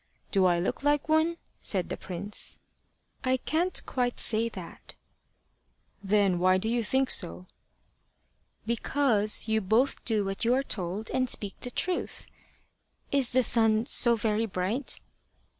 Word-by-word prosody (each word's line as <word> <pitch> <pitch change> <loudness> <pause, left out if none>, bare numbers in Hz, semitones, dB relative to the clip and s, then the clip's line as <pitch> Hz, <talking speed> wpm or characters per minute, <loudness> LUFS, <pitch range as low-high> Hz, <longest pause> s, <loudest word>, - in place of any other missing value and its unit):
"Do 190 -3 +4
I 175 -1 +2
look 175 - -2
like 290 0 +1
one?" 320 +2 +2 0.2
said 185 -4 -3
the - - -3
prince. 195 +3 -6 0.7
"I 260 0 +2
can't 340 +7 -1
quite 245 -1 -1
say 225 +1 +1
that." 185 -6 -10 1.1
"Then 200 -2 +2
why 185 +1 +4
do 190 - -3
you 235 +1 0
think 265 +4 +2
so?" 85 +2 +2 1.2
"Because 230 -2 +1
you 220 0 +1
both 225 +8 +1
do 215 -3 0
what 195 +3 -3
you 240 +2 +3
are 270 - +1
told 195 -2 -4
and 255 -1 +1
speak 200 -4 0
the 245 - -5
truth. 360 +8 -3 0.9
Is 275 -3 +2
the 255 0 +2
sun 225 -1 +3
so 235 -1 +4
very 220 0 0
bright?" 200 +8 -3
225 Hz, 140 wpm, -28 LUFS, 195-255 Hz, 1.2 s, Do